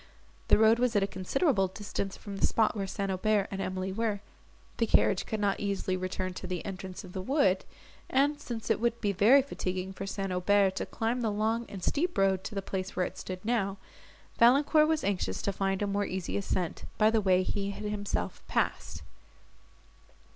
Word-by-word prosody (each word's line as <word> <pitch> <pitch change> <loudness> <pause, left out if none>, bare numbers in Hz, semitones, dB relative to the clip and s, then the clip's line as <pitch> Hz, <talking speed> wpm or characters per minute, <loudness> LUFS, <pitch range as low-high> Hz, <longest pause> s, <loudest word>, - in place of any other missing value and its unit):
The - - +6
road 220 +2 +5
was 245 -2 +1
at 205 - +4
a - - +1
considerable 195 - +1
distance 195 0 -5
from 200 -2 -8
the - - +3
spot 220 -1 +2
where 195 -2 -2
St. 195 0 -2
Aubert 200 +1 +1
and 195 0 -3
Emily 185 0 -3
were; 210 0 -1 0.6
the 230 - +1
carriage 200 -2 +3
could 220 - -2
not 200 -1 +1
easily 200 -2 -1
return 185 0 -3
to 185 - -7
the 180 -1 -4
entrance 190 0 -6
of 185 -2 -11
the 190 - -3
wood, 195 -6 +2 0.5
and, 290 +2 +2
since 235 -5 -4
it - - +2
would 235 0 0
be 205 - 0
very 225 +8 +6
fatiguing 185 -7 -4
for 195 +1 -6
St. 195 -1 -3
Aubert 190 +1 +3
to - - -2
climb 230 +2 -1
the 225 - +1
long 220 +3 0
and 190 -3 -8
steep 345 +4 0
road 190 -1 +2
to 215 - -6
the 195 - -2
place 190 0 -4
where 180 - +1
it - - -6 0.3
now 215 -4 0
stood, - - -25
Valancourt 285 +6 +5
was 315 -1 +1
anxious 180 - -1
to 200 - 0
find 195 +1 -1
a - - +2
more 200 0 -1
easy 185 -1 -4
ascent, 185 -3 -2
by 215 0 +5
the 225 -1 +2
way 185 -2 +3
he 200 +1 -2
had 200 - -6
himself 210 -1 -3
passed. - - -1
200 Hz, 200 wpm, -30 LUFS, 190-225 Hz, 0.6 s, The